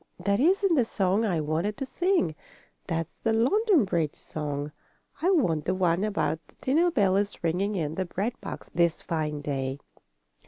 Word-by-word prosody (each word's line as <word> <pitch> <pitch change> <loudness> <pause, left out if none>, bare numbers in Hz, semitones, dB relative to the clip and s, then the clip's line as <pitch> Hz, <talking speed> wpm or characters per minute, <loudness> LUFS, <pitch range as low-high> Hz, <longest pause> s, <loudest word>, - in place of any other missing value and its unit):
"That 200 +1 +2
isn't 375 +5 +3
the 270 -6 +4
song 200 0 +1
I 180 -6 +1
wanted 160 +8 -1
to 270 - -3
sing. 350 - +1 0.5
That's 165 -2 -3
the 225 - +1
London 350 - +3
Bridge 165 -5 -1
song. 145 -1 -4 0.5
I 350 - +3
want 175 - +2
the 185 - +1
one 180 0 +2
about 205 -6 0
the - - -24
dinner 320 +7 +3
bell 200 - +2
is 200 -2 -2
ringing 185 +5 0
in 155 -4 -1
the 185 +3 -2
bread 200 +7 -2
box - - -8
this 170 -1 +1
fine 150 -3 -2
day. 135 -2 -2
190 Hz, 170 wpm, -27 LUFS, 160-245 Hz, 0.5 s, the